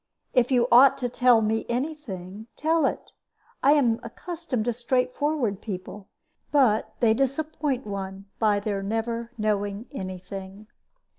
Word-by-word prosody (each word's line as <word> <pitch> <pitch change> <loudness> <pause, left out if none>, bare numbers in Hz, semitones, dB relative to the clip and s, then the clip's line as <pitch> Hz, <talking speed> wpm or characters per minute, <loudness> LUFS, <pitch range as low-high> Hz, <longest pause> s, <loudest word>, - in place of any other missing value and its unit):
If 250 -1 +3
you 245 -2 +3
ought 255 +3 +7
to 250 -2 -2
tell 245 -1 +4
me 220 +1 0
any 260 +7 -1
thing, 205 - -9
tell 320 +1 +2
it. - - -5 0.5
I 280 - +6
am 240 -6 +3
accustomed 290 -2 -4
to 240 - +1
straightforward 250 -1 0
people. 195 0 -7 0.4
But 250 -7 +3
they 225 -2 +5
disappoint 275 +1 -1
one 195 -1 -5
by 210 -2 +2
their 200 -1 -2
never 230 +3 -2
knowing 205 0 -1
any 185 -7 -5
thing." 195 +2 -9
230 Hz, 140 wpm, -26 LUFS, 205-265 Hz, 0.5 s, ought